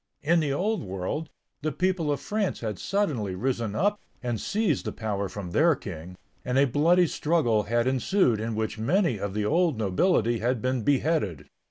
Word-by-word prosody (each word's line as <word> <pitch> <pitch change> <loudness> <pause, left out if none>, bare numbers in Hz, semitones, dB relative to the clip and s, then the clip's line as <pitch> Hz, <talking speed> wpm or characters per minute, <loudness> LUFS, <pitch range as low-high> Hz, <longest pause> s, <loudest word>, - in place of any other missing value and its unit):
In 170 +3 +3
the 150 -3 0
old 205 +10 0
world, 95 - -4 0.3
the 155 +1 -1
people 180 -2 0
of 145 - -1
France 205 +7 -2
had 105 -5 -4
suddenly 140 - -1
risen 115 -1 -2
up 205 - +1 0.2
and 120 -3 -2
seized 205 - 0
the - - -2
power 100 -3 -3
from 95 -2 -6
their 160 - +4
king, 90 - -8 0.3
and 125 +1 -1
a 140 - +6
bloody 165 +7 +4
struggle 150 -9 +1
had 120 0 +2
ensued 130 - +2
in 110 0 -3
which 110 0 -2
many 160 - +1
of 100 0 -4
the 105 -1 0
old 165 +1 +2
nobility 115 - +2
had 125 +2 0
been 130 +1 -1
beheaded. 140 - 0
130 Hz, 180 wpm, -26 LUFS, 105-165 Hz, 0.3 s, a